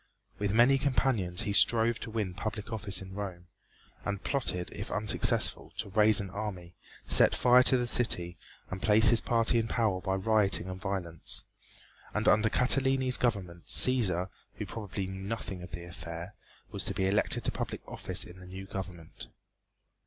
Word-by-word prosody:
With 100 Hz, -1 st, -1 dB
many 120 Hz, +5 st, +4 dB
companions 125 Hz, -10 st, 0 dB
he 100 Hz, -, -2 dB
strove 115 Hz, +2 st, +4 dB
to -, -, -6 dB
win 105 Hz, -5 st, -3 dB
public 105 Hz, +2 st, -5 dB
office 100 Hz, -3 st, -1 dB
in 95 Hz, 0 st, -11 dB
Rome, 95 Hz, -3 st, -6 dB, 0.6 s
and 100 Hz, -2 st, -4 dB
plotted, 120 Hz, -10 st, -1 dB
if -, -, -7 dB
unsuccessful, 105 Hz, +1 st, +1 dB
to -, -, -4 dB
raise 105 Hz, +1 st, +4 dB
an 100 Hz, -3 st, -6 dB
army, 95 Hz, -5 st, -6 dB, 0.3 s
set -, -, +5 dB
fire 125 Hz, +1 st, +5 dB
to 130 Hz, +1 st, +5 dB
the 120 Hz, -, -1 dB
city 90 Hz, -8 st, +1 dB, 0.3 s
and 95 Hz, +1 st, -5 dB
place 110 Hz, +1 st, +4 dB
his 115 Hz, -2 st, +4 dB
party 115 Hz, 0 st, +2 dB
in 115 Hz, -, -2 dB
power 105 Hz, -5 st, 0 dB
by 95 Hz, 0 st, -1 dB
rioting 100 Hz, -1 st, +1 dB
and 95 Hz, 0 st, -7 dB
violence. 95 Hz, -5 st, -4 dB, 0.7 s
And -, -, 0 dB
under 110 Hz, +1 st, +4 dB
Catiline's 130 Hz, +1 st, +3 dB
government 95 Hz, -8 st, -3 dB
Cæsar, 95 Hz, -8 st, +3 dB, 0.3 s
who -, -, -5 dB
probably 100 Hz, -3 st, -5 dB
knew 95 Hz, 0 st, -7 dB
nothing 100 Hz, -2 st, -5 dB
of 90 Hz, -, -9 dB
the 85 Hz, +1 st, -8 dB
affair, 85 Hz, +2 st, -8 dB, 0.4 s
was -, -, 0 dB
to -, -, 0 dB
be 95 Hz, -, 0 dB
elected 100 Hz, +2 st, +1 dB
to -, -, +1 dB
public -, -, -5 dB
office -, -, -2 dB
in 90 Hz, +1 st, -13 dB
the 90 Hz, -, -13 dB
new 95 Hz, +1 st, -8 dB
government. 90 Hz, -4 st, -8 dB
100 Hz, 170 wpm, -29 LUFS, 95-115 Hz, 0.7 s, set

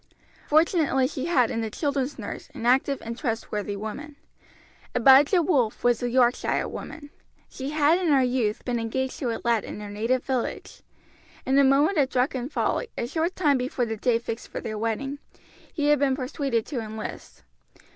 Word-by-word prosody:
Fortunately 305 Hz, -4 st, +3 dB
she 270 Hz, 0 st, -5 dB
had 255 Hz, -9 st, +3 dB
in 230 Hz, -, -2 dB
the 220 Hz, -, -2 dB
children's 280 Hz, +2 st, -2 dB
nurse -, -, -7 dB
an 230 Hz, -, -6 dB
active 265 Hz, +3 st, +3 dB
and 230 Hz, +1 st, -5 dB
trustworthy 220 Hz, -5 st, -3 dB
woman. 220 Hz, +9 st, -7 dB, 0.8 s
Abijah 275 Hz, -, +6 dB
Wolf 260 Hz, -11 st, +1 dB
was 240 Hz, -1 st, +2 dB
a 245 Hz, -, -1 dB
Yorkshire 245 Hz, 0 st, +2 dB
woman. 290 Hz, -2 st, -8 dB, 0.4 s
She 265 Hz, +1 st, -6 dB
had 305 Hz, +3 st, +3 dB
in 365 Hz, -, -1 dB
her 275 Hz, -4 st, +4 dB
youth 245 Hz, -4 st, -1 dB
been 245 Hz, -2 st, -1 dB
engaged 255 Hz, +3 st, -3 dB
to 255 Hz, -, -1 dB
a 230 Hz, -, -2 dB
lad 235 Hz, -2 st, +2 dB
in -, -, -7 dB
her 205 Hz, -1 st, -7 dB
native 230 Hz, +5 st, 0 dB
village. 260 Hz, -3 st, -3 dB, 0.6 s
In 265 Hz, -, +1 dB
a -, -, +6 dB
moment 290 Hz, +6 st, +3 dB
of 270 Hz, -2 st, +3 dB
drunken 255 Hz, 0 st, -1 dB
folly, -, -, -1 dB
a -, -, -1 dB
short 325 Hz, +8 st, -2 dB
time 290 Hz, -7 st, +2 dB
before 250 Hz, 0 st, -1 dB
the 225 Hz, -1 st, -3 dB
day 230 Hz, +2 st, +1 dB
fixed 230 Hz, 0 st, -6 dB
for -, -, -6 dB
their 215 Hz, -, -5 dB
wedding, 230 Hz, +6 st, -3 dB, 0.5 s
he 295 Hz, -3 st, 0 dB
had 295 Hz, -2 st, +4 dB
been 275 Hz, -2 st, +2 dB
persuaded 260 Hz, -3 st, -2 dB
to 270 Hz, -, -4 dB
enlist. 220 Hz, -1 st, -7 dB
260 Hz, 180 wpm, -25 LUFS, 230-285 Hz, 0.8 s, Abijah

